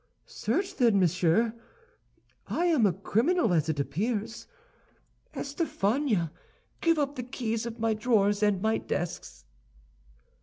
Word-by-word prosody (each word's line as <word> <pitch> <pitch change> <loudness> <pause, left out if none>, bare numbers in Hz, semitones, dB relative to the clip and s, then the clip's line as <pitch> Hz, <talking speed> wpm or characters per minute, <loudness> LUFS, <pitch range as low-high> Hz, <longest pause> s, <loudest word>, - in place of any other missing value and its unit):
"Search, 390 0 -2
then, 230 -6 +4
monsieur! 180 +5 +2 0.9
I 345 - 0
am 305 -11 +4
a - - +2
criminal, 225 - +1
as 160 -2 +1
it 155 -2 -1
appears. 210 - -2 0.9
Estafania, 250 - -1 0.5
give 330 -1 +3
up 290 -1 -1
the - - -2
keys 235 -2 -3
of 235 0 -7
my 225 -1 +1
drawers 210 -2 +2
and 205 -2 +2
my 220 0 +2
desks." - - -5
220 Hz, 120 wpm, -28 LUFS, 190-255 Hz, 0.9 s, then